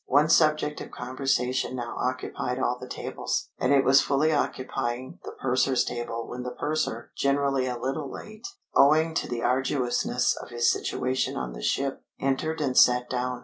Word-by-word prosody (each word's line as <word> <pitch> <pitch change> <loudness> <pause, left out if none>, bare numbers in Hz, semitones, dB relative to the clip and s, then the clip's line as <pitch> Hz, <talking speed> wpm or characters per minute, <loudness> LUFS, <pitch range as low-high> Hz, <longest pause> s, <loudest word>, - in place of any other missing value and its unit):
One 145 +3 +4
subject 155 -2 +3
of - - -7
conversation 130 0 -1
now 120 -2 -4
occupied 125 0 -2
all 125 -1 0
the 125 - -8
tables. - - -3
And 130 - +1
it 140 -1 +5
was 135 +1 +6
fully 145 +3 +2
occupying 130 -3 -2
the - - -7
purser's 130 0 +2
table 115 -1 -4
when 125 - -6
the 125 - -4
purser, 150 -6 -2
generally 140 -1 +1
a 125 -1 -2
little 135 +4 -3
late, 215 +2 -9 0.3
owing 155 +3 +5
to - - -1
the 120 -1 -3
arduousness 130 -1 +1
of - - -8
his 120 -1 +2
situation 130 +1 -1
on 65 -1 -4
the - - -8
ship, 135 - -1 0.2
entered 155 +4 -1
and 135 -3 0
sat 125 0 +5
down. 125 0 -2
130 Hz, 170 wpm, -27 LUFS, 125-140 Hz, 0.3 s, was